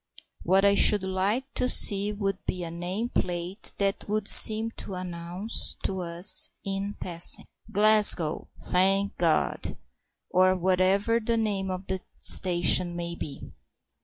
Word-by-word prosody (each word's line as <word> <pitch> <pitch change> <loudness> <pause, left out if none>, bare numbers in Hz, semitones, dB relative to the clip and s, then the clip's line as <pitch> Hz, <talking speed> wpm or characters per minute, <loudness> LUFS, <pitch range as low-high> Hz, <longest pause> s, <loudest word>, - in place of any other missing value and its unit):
What 190 +3 +1
I 200 - +3
should 205 0 +5
like 190 +6 -2
to 250 - -1
see 205 -3 +5
would 195 -2 -5
be 180 -1 -4
a 165 - -7
name 180 +7 -5
plate 180 0 -3
that 200 0 -3
would 210 -1 -3
seem 220 +1 +6
to 195 - -8
announce 180 +4 -5
to 190 -1 -4
us 170 +2 +2 0.2
in 195 +1 -5
passing: 170 -1 0 0.3
"Glasgow, 210 -6 +2
thank 195 +2 -1
God!" 165 -2 -2 0.5
or 185 0 +2
whatever 190 +5 0
the 230 +1 -2
name 200 -4 -3
of 185 +1 -7
the 190 0 -4 0.2
station 175 -1 +3
may 170 0 -6
be. 145 -4 -10
190 Hz, 135 wpm, -25 LUFS, 180-205 Hz, 0.5 s, seem